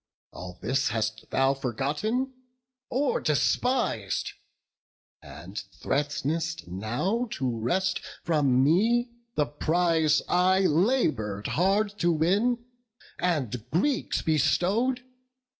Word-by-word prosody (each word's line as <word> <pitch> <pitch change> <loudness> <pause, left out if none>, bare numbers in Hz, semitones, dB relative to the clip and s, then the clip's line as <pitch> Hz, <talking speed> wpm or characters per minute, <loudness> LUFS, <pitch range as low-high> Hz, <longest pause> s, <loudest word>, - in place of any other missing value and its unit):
All 90 0 -9
this 135 +5 +1
hast 110 0 -3
thou 135 +1 +2
forgotten, 145 - -2 0.6
or 275 +3 0
despis'd; 150 - 0 0.9
And 95 +4 -8 0.2
threat'nest 150 +3 -1
now 120 - -1
to 130 - -2
wrest 190 +12 0 0.2
from 140 -6 +3
me 230 - +3 0.2
the 150 - +2
prize 160 +1 +2
I 185 +2 +3
labour'd 150 - +1
hard 200 +4 +1
to 175 0 +3
win, 205 +10 +1 0.5
and 130 -10 -1
Greeks 255 - 0
bestow'd. 210 - +1
160 Hz, 90 wpm, -27 LUFS, 130-205 Hz, 0.9 s, from